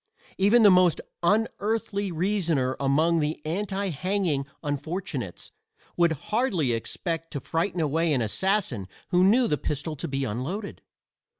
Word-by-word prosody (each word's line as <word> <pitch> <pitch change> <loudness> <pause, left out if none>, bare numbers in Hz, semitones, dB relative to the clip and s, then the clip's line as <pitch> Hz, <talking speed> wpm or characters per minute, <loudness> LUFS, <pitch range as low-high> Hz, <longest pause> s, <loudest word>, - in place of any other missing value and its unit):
Even 215 +5 +5
the 205 - +8
most 180 -2 +4 0.2
unearthly 205 +1 0
reasoner 165 -7 0
among 155 +5 +2
the 150 0 -1
anti 195 +4 -2
hanging 170 -3 -1 0.2
unfortunates 145 - -4 0.4
would 170 -2 +3
hardly 185 - 0
expect 165 +8 -3
to 145 - -4
frighten 170 +6 -2
away 160 +1 +1
an 135 -4 +2
assassin 140 - 0 0.2
who 180 -1 +4
knew 230 +6 +5
the 150 - 0
pistol 150 +2 -3
to - - -4
be 135 -1 -2
unloaded. 140 - -4
170 Hz, 130 wpm, -26 LUFS, 145-195 Hz, 0.4 s, the